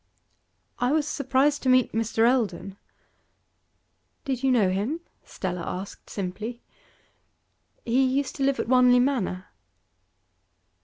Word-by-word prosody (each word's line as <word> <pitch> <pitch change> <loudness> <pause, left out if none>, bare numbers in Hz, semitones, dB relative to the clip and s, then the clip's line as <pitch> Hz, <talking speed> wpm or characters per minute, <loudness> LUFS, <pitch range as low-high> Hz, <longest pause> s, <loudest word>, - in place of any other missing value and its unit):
'I 250 +3 +1
was 305 -1 +1
surprised 280 0 +1
to 260 - 0
meet 255 -2 +4
Mr. 225 +1 +1
Eldon.' 225 -6 0 1.5
'Did 260 -3 -2
you 270 - +2
know 210 -7 +3
him?' 225 - -2 0.2
Stella 180 -2 -5
asked 190 +4 -7
simply. 210 +5 -5 1.3
'He 245 +3 +2
used 265 +1 0
to 275 - -1
live 275 0 +1
at - - -2
Wanley 250 0 +5
Manor. 235 -8 -1
250 Hz, 115 wpm, -25 LUFS, 205-270 Hz, 1.5 s, Wanley